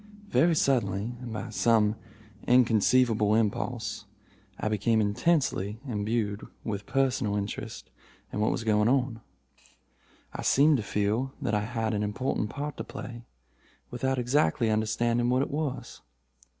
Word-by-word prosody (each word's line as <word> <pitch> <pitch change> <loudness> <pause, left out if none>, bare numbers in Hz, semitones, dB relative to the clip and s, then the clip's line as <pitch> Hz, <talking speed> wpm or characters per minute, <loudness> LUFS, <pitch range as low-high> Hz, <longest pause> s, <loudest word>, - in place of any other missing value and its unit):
Very 170 -4 +3
suddenly, 115 -6 +1
and 120 -2 -7
by 110 0 -5
some 110 -1 +3 0.5
inconceivable 115 -2 +4
impulse, 110 -1 -1 0.5
I - - -1
became 110 +1 +1
intensely 105 - +1
imbued 105 -2 -1 0.2
with 100 -2 -4
personal 130 -5 +1
interest 100 0 -5 0.4
in - - -2
what 105 - +2
was - - -2
going 105 0 +3
on. 125 -3 0 1.1
I - - -5
seemed 145 +2 +4
to - - -2
feel 105 +6 -1
that - - -2
I 105 0 +1
had 115 -1 -2
an 105 - 0
important 105 +1 -1
part 145 +4 -5
to - - -4
play, 120 -1 -8 0.7
without 130 +2 -1
exactly 125 -2 +2
understanding 115 +2 +1
what 130 +2 +3
it - - -5
was. 140 -4 -4
115 Hz, 135 wpm, -28 LUFS, 105-130 Hz, 1.1 s, inconceivable